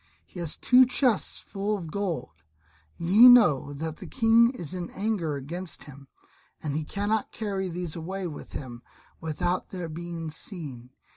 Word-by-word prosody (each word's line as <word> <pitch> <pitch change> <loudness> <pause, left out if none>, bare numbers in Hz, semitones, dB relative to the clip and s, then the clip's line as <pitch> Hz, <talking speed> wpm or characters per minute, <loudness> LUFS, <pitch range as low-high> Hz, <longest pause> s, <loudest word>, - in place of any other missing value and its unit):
He - - -11
has 170 -3 -1
two 255 0 +5
chests 250 -4 +2
full 205 +2 -3
of 165 -5 -8
gold; 185 - -3 0.6
ye 205 +9 +7
know 180 - +6
that 160 +2 -5
the - - -9
King 230 +1 +4
is 180 - -5
in 180 -2 -4
anger 195 -8 -2
against 165 +6 -5
him, 140 -1 -13 0.6
and 145 -2 -2
he 155 - -1
cannot 205 +6 -1
carry 195 -4 -3
these 175 -1 -4
away 185 +3 -4
with 155 -4 -8
him 120 -3 -7 0.4
without 165 +3 -2
their 180 -3 -5
being 165 0 -6
seen. 145 - -6
175 Hz, 155 wpm, -27 LUFS, 155-205 Hz, 0.6 s, ye